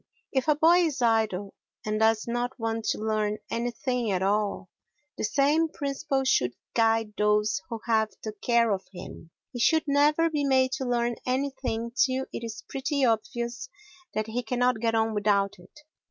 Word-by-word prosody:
If 265 Hz, 0 st, 0 dB
a 300 Hz, -, +4 dB
boy 330 Hz, +4 st, +5 dB
is 315 Hz, -6 st, 0 dB
idle 215 Hz, -4 st, +1 dB, 0.3 s
and 215 Hz, 0 st, -1 dB
does 220 Hz, 0 st, +3 dB
not 240 Hz, +2 st, -2 dB
want 225 Hz, -1 st, -2 dB
to -, -, 0 dB
learn 215 Hz, -1 st, -1 dB
anything 240 Hz, 0 st, -1 dB
at 190 Hz, -1 st, 0 dB
all, 200 Hz, -1 st, 0 dB, 0.4 s
the -, -, -5 dB
same 295 Hz, +7 st, +2 dB
principle 275 Hz, -2 st, -2 dB
should 125 Hz, -, +2 dB, 0.2 s
guide 225 Hz, -2 st, +2 dB
those 210 Hz, -1 st, +2 dB
who 230 Hz, -2 st, -5 dB
have 220 Hz, -2 st, +2 dB
the 215 Hz, -, -4 dB
care 230 Hz, +2 st, +2 dB
of 195 Hz, -1 st, -2 dB
him—he 180 Hz, +5 st, -11 dB
should 315 Hz, +6 st, +3 dB
never 295 Hz, +3 st, +3 dB
be 295 Hz, -2 st, 0 dB
made 260 Hz, -2 st, +3 dB
to 265 Hz, -, -3 dB
learn 240 Hz, -1 st, 0 dB
anything 255 Hz, -3 st, -2 dB
till 260 Hz, +1 st, +1 dB
it -, -, -5 dB
is 225 Hz, -2 st, -6 dB
pretty 270 Hz, 0 st, 0 dB
obvious 235 Hz, -, -2 dB, 0.5 s
that 215 Hz, -, 0 dB
he 225 Hz, +3 st, -3 dB
cannot 245 Hz, 0 st, +1 dB
get 225 Hz, 0 st, 0 dB
on 225 Hz, 0 st, +1 dB
without 200 Hz, -2 st, +1 dB
it. 240 Hz, +12 st, -17 dB
235 Hz, 170 wpm, -27 LUFS, 215-265 Hz, 0.5 s, boy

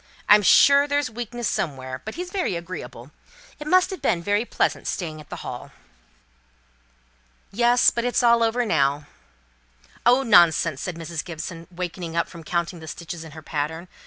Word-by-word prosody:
I'm 210 Hz, 0 st, +7 dB
sure 280 Hz, +8 st, +6 dB
there's 285 Hz, -3 st, 0 dB
weakness 240 Hz, 0 st, -4 dB
somewhere; 130 Hz, -8 st, -3 dB
but 220 Hz, -, -7 dB
he's 360 Hz, +2 st, -6 dB
very 370 Hz, -, -1 dB
agreeable. 150 Hz, -7 st, -8 dB, 0.5 s
It 300 Hz, -, -7 dB
must 370 Hz, +4 st, +3 dB
have 380 Hz, -, -7 dB
been 170 Hz, -1 st, 0 dB
very 205 Hz, +4 st, +1 dB
pleasant, -, -, -1 dB
staying 155 Hz, -5 st, -4 dB
at 150 Hz, -, -17 dB
the -, -, -8 dB
Hall." -, -, -7 dB, 1.8 s
"Yes; 240 Hz, +3 st, +4 dB
but 235 Hz, -, -2 dB
it's 245 Hz, +1 st, +1 dB
all 235 Hz, -1 st, +5 dB
over 230 Hz, +2 st, +1 dB
now." 145 Hz, -6 st, +1 dB, 1.0 s
"Oh, 250 Hz, +3 st, +4 dB
nonsense!" 170 Hz, -, +4 dB
said 180 Hz, -, -4 dB
Mrs. 165 Hz, -1 st, -5 dB
Gibson, 165 Hz, 0 st, -7 dB
wakening 175 Hz, -1 st, -6 dB
up 170 Hz, -, +1 dB
from 170 Hz, -2 st, -12 dB
counting 170 Hz, +1 st, -2 dB
the 160 Hz, -, -11 dB
stitches 165 Hz, +2 st, -7 dB
in 160 Hz, -2 st, -12 dB
her 155 Hz, 0 st, -11 dB
pattern. 160 Hz, +3 st, -4 dB
175 Hz, 165 wpm, -23 LUFS, 160-235 Hz, 1.8 s, I'm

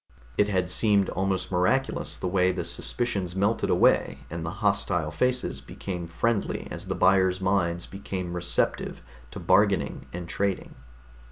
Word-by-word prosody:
It 105 Hz, -, +3 dB
had 90 Hz, -2 st, 0 dB
seemed 100 Hz, -3 st, +3 dB
almost 95 Hz, -1 st, -1 dB
miraculous 95 Hz, +10 st, +1 dB
the -, -, -3 dB
way 90 Hz, 0 st, +3 dB
the 90 Hz, -1 st, -3 dB
suspicions 95 Hz, +1 st, -1 dB
melted 100 Hz, +4 st, +1 dB
away 70 Hz, +1 st, +3 dB
and 85 Hz, 0 st, -4 dB
the 80 Hz, -, -3 dB, 0.2 s
hostile 85 Hz, -6 st, +1 dB
faces 125 Hz, +11 st, 0 dB
became 90 Hz, -3 st, -6 dB
friendly 105 Hz, +6 st, -1 dB
as -, -, -7 dB
the -, -, -2 dB
buyers' 95 Hz, -1 st, +3 dB
minds 90 Hz, -3 st, 0 dB
became 95 Hz, -2 st, -5 dB
receptive 90 Hz, -1 st, -1 dB, 0.3 s
to -, -, -8 dB
bargaining -, -, +2 dB
and 90 Hz, 0 st, -6 dB
trading. 100 Hz, +2 st, -2 dB
95 Hz, 145 wpm, -26 LUFS, 85-100 Hz, 0.3 s, It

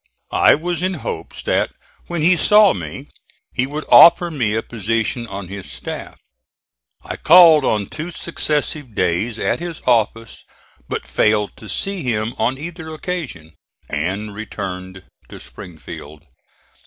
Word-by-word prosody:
I -, -, +5 dB
was 170 Hz, +2 st, -3 dB
in 185 Hz, 0 st, -1 dB
hopes -, -, -6 dB
that -, -, +1 dB, 0.4 s
when 170 Hz, -3 st, -2 dB
he 180 Hz, +3 st, +5 dB
saw 210 Hz, +4 st, +5 dB
me 80 Hz, -5 st, -8 dB, 0.4 s
he 130 Hz, -, 0 dB
would 150 Hz, +2 st, -5 dB
offer 170 Hz, 0 st, +8 dB
me 120 Hz, -8 st, -1 dB
a 110 Hz, -, -1 dB
position 115 Hz, +1 st, -2 dB
on 100 Hz, -3 st, -7 dB
his 100 Hz, 0 st, -8 dB
staff. -, -, -6 dB, 0.9 s
I -, -, -5 dB
called 165 Hz, -3 st, +7 dB
on 105 Hz, -5 st, +1 dB
two 155 Hz, -, -6 dB
successive 150 Hz, -7 st, -3 dB
days 90 Hz, +6 st, 0 dB
at -, -, -1 dB
his 170 Hz, -2 st, -6 dB
office 115 Hz, -2 st, 0 dB, 0.5 s
but -, -, -3 dB
failed 105 Hz, -, +1 dB
to 110 Hz, -, -11 dB
see 195 Hz, -2 st, -2 dB
him 115 Hz, -3 st, -1 dB
on 130 Hz, +3 st, 0 dB
either 160 Hz, +1 st, -7 dB
occasion, 150 Hz, -, -6 dB, 0.4 s
and 95 Hz, +8 st, -2 dB
returned 95 Hz, -3 st, -7 dB, 0.3 s
to -, -, -10 dB
Springfield. 80 Hz, -2 st, -11 dB
115 Hz, 140 wpm, -19 LUFS, 100-160 Hz, 0.9 s, offer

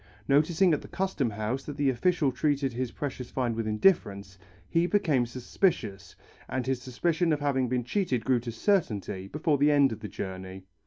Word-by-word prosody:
Noticing 160 Hz, +5 st, +4 dB
at 150 Hz, -, 0 dB
the -, -, -11 dB
Custom 185 Hz, -10 st, -1 dB
House 110 Hz, +5 st, -3 dB
that 145 Hz, -, -7 dB
the 140 Hz, -2 st, +2 dB
official 150 Hz, +2 st, +1 dB
treated 135 Hz, 0 st, 0 dB
his 125 Hz, +1 st, -2 dB
precious 130 Hz, -3 st, -5 dB
find 120 Hz, -3 st, -1 dB
with 115 Hz, -1 st, -2 dB
indifference, 100 Hz, -, +1 dB, 0.3 s
he 170 Hz, +1 st, +2 dB
became 150 Hz, -12 st, +2 dB
suspicious, 120 Hz, -, -2 dB, 0.3 s
and 130 Hz, -2 st, -2 dB
his 130 Hz, -1 st, -1 dB
suspicion 165 Hz, +7 st, 0 dB
of 150 Hz, -, +1 dB
having 135 Hz, -4 st, 0 dB
been 125 Hz, 0 st, 0 dB
cheated 125 Hz, -, -1 dB
grew 130 Hz, -1 st, +3 dB
to 120 Hz, 0 st, -6 dB
certainty 110 Hz, -, 0 dB
before 150 Hz, -, 0 dB
the 145 Hz, +1 st, +5 dB
end 145 Hz, -3 st, +4 dB
of 110 Hz, -, -5 dB
the 105 Hz, -, -6 dB
journey. 95 Hz, 0 st, -7 dB
130 Hz, 180 wpm, -28 LUFS, 115-150 Hz, 0.3 s, the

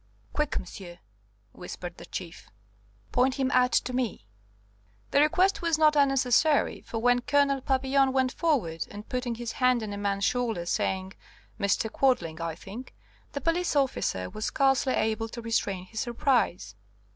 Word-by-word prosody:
"Quick, 300 Hz, -1 st, 0 dB
monsieur!" 175 Hz, -1 st, -8 dB, 0.5 s
whispered 175 Hz, +2 st, -8 dB
the -, -, -11 dB
Chief; 175 Hz, -2 st, -7 dB, 0.6 s
"point 255 Hz, +2 st, +2 dB
him 265 Hz, -2 st, 0 dB
out 250 Hz, 0 st, +4 dB
to 255 Hz, -, +1 dB
me." 245 Hz, -, -2 dB, 0.9 s
The 280 Hz, -, +4 dB
request 360 Hz, +6 st, +3 dB
was 335 Hz, -2 st, +1 dB
not 305 Hz, -1 st, +4 dB
unnecessary, 275 Hz, +1 st, +3 dB
for 230 Hz, -, -6 dB
when 245 Hz, +2 st, +3 dB
Colonel 280 Hz, 0 st, +2 dB
Papillon 270 Hz, 0 st, +2 dB
went 260 Hz, -1 st, +1 dB
forward, 235 Hz, -, 0 dB
and, 205 Hz, +1 st, -9 dB
putting 250 Hz, -2 st, -2 dB
his 235 Hz, 0 st, -5 dB
hand 250 Hz, -2 st, +2 dB
on 210 Hz, -1 st, -5 dB
a -, -, -5 dB
man's 200 Hz, -1 st, -1 dB
shoulder, 230 Hz, -8 st, 0 dB
saying, 190 Hz, +2 st, -1 dB, 0.5 s
"Mr. 200 Hz, +2 st, +1 dB
Quadling, 170 Hz, -12 st, +1 dB
I 165 Hz, -1 st, -3 dB
think," 220 Hz, +10 st, -10 dB, 0.4 s
the 280 Hz, -, -3 dB
police 340 Hz, 0 st, 0 dB
officer 255 Hz, -, 0 dB
was 215 Hz, -, -5 dB
scarcely 270 Hz, -2 st, +2 dB
able 220 Hz, +1 st, 0 dB
to 235 Hz, -, -8 dB
restrain 205 Hz, -5 st, -1 dB
his 220 Hz, +3 st, -7 dB
surprise. 235 Hz, -, 0 dB
245 Hz, 155 wpm, -28 LUFS, 200-270 Hz, 0.9 s, out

